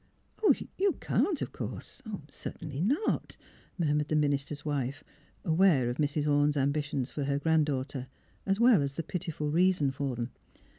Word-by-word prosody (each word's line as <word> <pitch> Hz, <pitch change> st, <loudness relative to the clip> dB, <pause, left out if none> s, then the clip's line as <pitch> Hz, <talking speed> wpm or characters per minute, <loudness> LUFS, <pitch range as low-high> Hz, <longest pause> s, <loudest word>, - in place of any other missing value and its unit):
" 435 Hz, -, +2 dB
'' -, -, -10 dB
You 395 Hz, 0 st, +3 dB
can't, 355 Hz, -7 st, 0 dB
of -, -, -5 dB
course -, -, -7 dB, 0.2 s
— 145 Hz, -, -16 dB
certainly 150 Hz, -1 st, -6 dB
not," 280 Hz, -, 0 dB, 0.4 s
mur 155 Hz, -5 st, +1 dB
mured 150 Hz, 0 st, +1 dB
the 155 Hz, -, 0 dB
minister's 145 Hz, 0 st, 0 dB
wife, 140 Hz, -1 st, -2 dB, 0.4 s
aware 160 Hz, -7 st, +4 dB
of 120 Hz, -, -5 dB
Mrs. 150 Hz, 0 st, 0 dB
Orne's 145 Hz, 0 st, +3 dB
ambitions 140 Hz, -1 st, 0 dB
for 145 Hz, -, -3 dB
her 140 Hz, 0 st, +1 dB
grand 160 Hz, 0 st, +3 dB
daughter, 135 Hz, -2 st, -3 dB, 0.4 s
as 195 Hz, +1 st, 0 dB
well 235 Hz, -7 st, +6 dB
as 140 Hz, 0 st, -2 dB
the 165 Hz, -, -2 dB
pitiful 160 Hz, -3 st, -3 dB
reason 175 Hz, -4 st, +3 dB
for 135 Hz, -2 st, -2 dB
them. 120 Hz, +1 st, -4 dB
150 Hz, 175 wpm, -30 LUFS, 140-165 Hz, 0.4 s, well